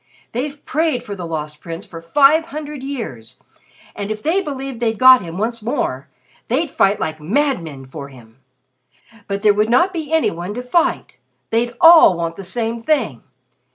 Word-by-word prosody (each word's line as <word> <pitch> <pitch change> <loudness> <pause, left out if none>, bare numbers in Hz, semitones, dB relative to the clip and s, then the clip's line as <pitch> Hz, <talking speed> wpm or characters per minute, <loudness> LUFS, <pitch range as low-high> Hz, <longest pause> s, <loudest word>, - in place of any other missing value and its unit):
They've 280 +4 -5
prayed 305 -5 0
for 205 -4 -6
the 180 -3 -6
Lost 150 -2 -5
Prince 165 0 -7
for 165 -1 -10
five 290 - +4
hundred 300 -1 -7
years, 225 - -6 0.6
and 200 0 -5
if 215 0 -5
they 340 +6 +1
believed 270 -6 -6
they'd 225 -2 0
got 255 0 +8
him 170 -1 -7
once 230 +3 -2
more, 210 - -2 0.4
they'd 280 +5 0
fight 200 +1 +2
like 155 0 -4
madmen 170 - -1
for 140 +1 -8
him. 120 -3 -17 0.9
But 200 +1 -3
there 210 -1 +5
would 210 +2 +1
not 345 +11 +3
be 320 -3 -5
any 320 -1 +2
one 175 +5 -6
to 245 - -5
fight. 330 +7 0 0.3
They'd 235 +1 0
all 325 - +8
want 165 -1 -3
the 195 - -8
same 225 +4 -3
thing! 230 - 0
225 Hz, 175 wpm, -19 LUFS, 170-280 Hz, 0.9 s, got